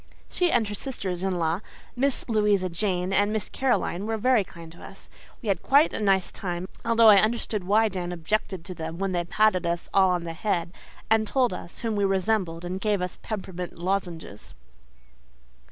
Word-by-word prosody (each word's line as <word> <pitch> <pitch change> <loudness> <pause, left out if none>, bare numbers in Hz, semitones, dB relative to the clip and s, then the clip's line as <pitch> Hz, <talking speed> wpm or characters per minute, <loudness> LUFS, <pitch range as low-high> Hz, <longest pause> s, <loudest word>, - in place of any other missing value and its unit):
She 360 -1 +2
and 230 -3 +2
her 205 - -4
sisters 195 -7 -4
in 190 -1 -1
law, 165 +1 0 0.4
Miss 270 +1 0
Louisa 210 -4 +2
Jane 180 +1 -1
and 205 +2 +3
Miss 215 -2 -2
Caroline, 225 -7 0
were 225 0 -1
very 245 -1 +3
kind 170 -3 -12
to 170 - -15
us. - - -12 0.3
We - - -6
had 190 -3 +1
quite 285 +4 +4
a - - -2
nice 195 -3 +2
time, 180 -1 -4 0.2
although 230 -1 +5
I 205 -2 +8
understood 215 -3 -1
why 215 +4 +4
Dan 180 -3 -4
objected 175 +1 -2
to 185 - -6
them 160 -1 -6
when 195 +1 -1
they 175 -1 0
patted 210 0 +2
us 170 0 -2
all 190 -1 +5
on 180 -1 0
the 165 -1 -5
head 170 -1 -2 0.4
and 220 -1 +3
told 250 -4 +2
us 175 -1 -8
whom 225 -2 -1
we 205 - +1
resembled 190 -3 0
and 185 +2 -4
gave 210 -2 +1
us 180 0 -5
peppermint 185 -4 -6
lozenges. 170 - -4
195 Hz, 190 wpm, -26 LUFS, 175-215 Hz, 0.4 s, I